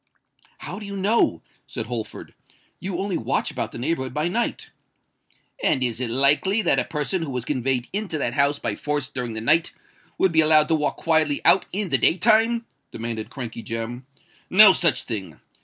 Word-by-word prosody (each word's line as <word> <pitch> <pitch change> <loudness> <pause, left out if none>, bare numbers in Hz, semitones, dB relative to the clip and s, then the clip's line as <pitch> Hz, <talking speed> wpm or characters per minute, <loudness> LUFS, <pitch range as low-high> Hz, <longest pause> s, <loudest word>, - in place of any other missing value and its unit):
"How - - -7
do 210 - -9
you 200 0 -6
know?" 195 - +1 0.2
said - - -4
Holford. 115 -2 -6 0.5
"You 185 -1 -4
only 195 -1 -2
watch - - -1
about - - -4
the - - -8
neighbourhood 130 -1 -3
by 155 +3 0
night." 235 +6 -3 0.9
"And 130 - +2
is 120 -2 -1
it 125 - -1
likely 145 - +2
that 135 -7 +2
a 125 - -1
person 165 +4 -2
who 160 - -4
was 125 -3 -4
conveyed 130 -2 -1
into 200 -5 -3
that 120 -5 -2
house 140 +2 +2
by 115 -6 -3
force 145 -3 -1
during 125 -3 -5
the 110 - -4
night, 165 +9 +2 0.4
would 190 - +2
be 160 -1 +4
allowed 155 -1 +5
to 160 - +3
walk 150 -1 -1
quietly 160 -3 +1
out 190 - +5
in 200 0 0
the 130 - +2
day 165 - +3
time?" 230 +2 +3 0.2
demanded 115 -1 -5
Crankey 120 -4 -7
Jem. 115 +3 -6 0.4
"No 200 +1 +8
such 170 -4 +2
thing! 95 - -6
150 Hz, 190 wpm, -23 LUFS, 125-185 Hz, 0.9 s, No